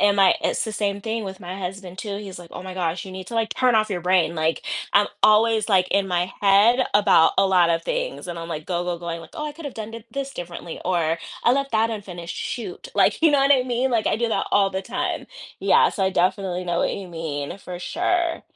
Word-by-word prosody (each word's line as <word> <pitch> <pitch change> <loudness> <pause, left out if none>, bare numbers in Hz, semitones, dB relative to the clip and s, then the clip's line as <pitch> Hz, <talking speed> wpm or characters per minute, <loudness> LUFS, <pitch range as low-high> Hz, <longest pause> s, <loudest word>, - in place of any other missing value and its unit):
am 205 -1 +4
I 195 -1 +6
it's - - 0
the 220 - -5
same 200 -1 -1
thing 225 +2 -3
with 190 -2 -6
my 180 +1 -7
husband, 185 -1 -6
too. 200 -1 -4
He's 195 -3 -8
like, 170 -1 -12
"Oh, - - -7
my 185 -1 -7
gosh, 175 -1 -2
you 190 - -9
need 185 -1 -8
to, 230 - -7
like, 225 -1 0
turn 255 -2 +3
off 215 0 +2
your 180 -3 -2
brain." 180 -1 +2
Like, 160 0 0 0.3
I'm 205 0 +5 0.2
always, 215 0 +4
like, 185 -3 +4
in 200 -1 +2
my 180 0 0
head 205 +5 +5
about 200 -5 +5
a 195 - +5
lot 180 -3 +4
of 165 - +1
things. - - -3
And 175 -1 -5
I'm 165 - -7
like, 155 -2 -5
go, 175 -1 -1
go, 175 -1 -3
going 170 -1 -5
like, 165 - -13
"Oh, 300 - -4
I 295 - -5
could've 295 -4 -8
done 220 +1 -7
it 230 0 -10
this 275 0 -4
differently." 175 -2 -7
Or 170 -2 +1 0.3
"I 240 - +5
left 275 +1 0
that 225 +1 +2
unfinished, 180 -6 -6
shoot." 235 - -5
Like, - - +3
you 320 - +6
know 285 - +4
what 275 +1 +5
I 260 - +4
mean? 250 +1 0
Like, 225 -2 +1
I - - +1
do 235 - 0
that - - 0
all 200 -1 +4
the 190 0 -3
time. - - -3 0.3
Yeah. - - +4
So, 195 - -1
I 190 - +2
definitely 185 0 0
know 175 -1 -1
what - - +1
you 200 -2 -7
mean, 160 -2 -5
for 180 -2 -8
sure. 345 - -1
195 Hz, 250 wpm, -23 LUFS, 175-225 Hz, 0.3 s, I